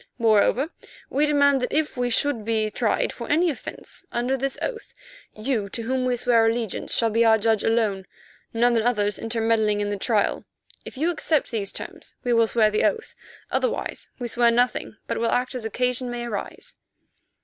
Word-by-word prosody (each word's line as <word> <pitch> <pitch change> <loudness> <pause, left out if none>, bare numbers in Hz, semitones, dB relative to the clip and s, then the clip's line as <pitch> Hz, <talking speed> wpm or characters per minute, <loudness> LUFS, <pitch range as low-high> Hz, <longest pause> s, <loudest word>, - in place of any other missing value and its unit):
Moreover, 230 +5 +3 0.4
we 295 +3 +2
demand 285 -2 +3
that 250 - -2
if 310 0 0
we 245 -1 0
should 245 -1 +1
be 215 -1 0
tried 225 0 0
for 235 - -8
any 330 +3 +3
offence 275 - -8
under 245 +2 0
this 270 +1 -2
oath, 470 -3 -5 0.4
you 215 -2 -2
to 230 - -4
whom 255 +2 -1
we 250 -1 +1
swear 235 -2 +3
allegiance 225 -3 -2
shall 230 -1 +1
be 230 +2 +3
our 225 -1 +5
judge 220 0 +1
alone, 210 -5 0 0.4
none 235 +1 +2
others 210 -3 +1
intermeddling 225 -2 +1
in 205 0 -1
the 205 - -2
trial. 210 -1 +1 0.4
If - - -9
you 325 +5 +1
accept 310 -3 0
these 205 -4 -2
terms - - -8
we 245 - +1
will 230 -1 +4
swear 215 -2 +3
the 215 - +1
oath; 450 - 0 0.4
otherwise - - -2
we 245 - -4
swear 235 0 +3
nothing, 240 -1 0
but - - -3
will 230 0 +1
act 250 +1 0
as 250 -3 -5
occasion 250 +2 -1
may 240 0 -4
arise." 235 - -6
235 Hz, 180 wpm, -24 LUFS, 220-255 Hz, 0.4 s, our